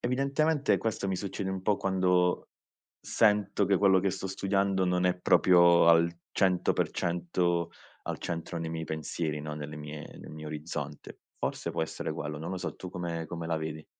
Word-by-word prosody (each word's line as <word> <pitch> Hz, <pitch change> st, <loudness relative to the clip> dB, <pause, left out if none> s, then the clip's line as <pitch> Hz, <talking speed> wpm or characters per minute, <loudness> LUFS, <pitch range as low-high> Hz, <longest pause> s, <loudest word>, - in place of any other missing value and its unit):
evidentemente 140 Hz, +4 st, +1 dB
questo 110 Hz, -3 st, -2 dB
mi 95 Hz, -, 0 dB
succede 95 Hz, 0 st, -4 dB
un 95 Hz, -1 st, -4 dB
po' 105 Hz, +1 st, +2 dB
quando 90 Hz, -2 st, +1 dB, 0.5 s
sento 105 Hz, -2 st, +2 dB
che 100 Hz, 0 st, +3 dB
quello 95 Hz, -1 st, +5 dB
che 95 Hz, +1 st, +1 dB
sto 95 Hz, 0 st, -4 dB
studiando 95 Hz, 0 st, 0 dB
non 90 Hz, 0 st, +1 dB
è 90 Hz, -1 st, +3 dB
proprio 85 Hz, -2 st, +5 dB
al 85 Hz, 0 st, +5 dB, 0.2 s
100% 85 Hz, -2 st, +1 dB, 0.4 s
al -, -, -2 dB
centro 85 Hz, +1 st, -4 dB
nei 80 Hz, -1 st, -4 dB
miei 80 Hz, 0 st, -3 dB
pensieri, 80 Hz, 0 st, -3 dB
no 75 Hz, 0 st, -5 dB
nelle 75 Hz, 0 st, -6 dB
mie 75 Hz, +1 st, -7 dB
nel -, -, -10 dB
mio 75 Hz, 0 st, -8 dB
orizzonte. 75 Hz, -1 st, -6 dB, 0.2 s
Forse -, -, -2 dB
può -, -, -1 dB
essere 80 Hz, -, -4 dB
quello, 75 Hz, 0 st, -5 dB
non 80 Hz, +3 st, -5 dB
lo 95 Hz, -, -3 dB
so, 90 Hz, -, -4 dB
tu 90 Hz, -, -8 dB
come 85 Hz, -3 st, -4 dB
come 85 Hz, 0 st, -5 dB
la 80 Hz, -1 st, 0 dB
vedi? 80 Hz, 0 st, -5 dB
90 Hz, 175 wpm, -29 LUFS, 80-95 Hz, 0.5 s, quello